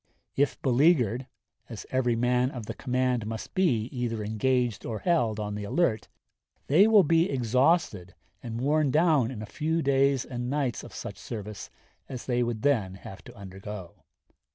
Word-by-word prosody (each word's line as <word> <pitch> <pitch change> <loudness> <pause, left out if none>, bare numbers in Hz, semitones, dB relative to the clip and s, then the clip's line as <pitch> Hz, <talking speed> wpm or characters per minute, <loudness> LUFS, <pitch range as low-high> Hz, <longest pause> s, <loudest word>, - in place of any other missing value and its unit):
If 140 +1 +1
beleaguered, 130 - +3 0.4
as 115 -4 -8
every 125 -2 +1
man 125 +2 +2
of 125 -5 -7
the - - -5
command 125 -3 -1
must 110 0 -6
be 150 - +2
either 115 -3 -2
engaged 120 +1 0
or 110 - -4
held 120 - +1
on 105 -1 -3
the 105 0 -5
alert, 120 0 0 0.6
they 180 +9 +5
will 215 -3 +6
be 165 +2 +3
exhausted 125 - +1 0.3
and 115 -1 -5
worn 145 +3 +2
down 150 -5 +3
in 115 -5 -6
a - - -5
few 160 +7 -2
days 135 -1 +2
and 125 -1 -5
nights 140 -4 -1
of - - -11
such - - -7
service 105 -3 -7 0.4
as 125 -2 -7
they 125 -1 0
would 120 -1 -2
then 110 -10 +1
have 95 0 -11
to 120 - -12
undergo. 95 -2 -9
125 Hz, 165 wpm, -27 LUFS, 110-140 Hz, 0.6 s, will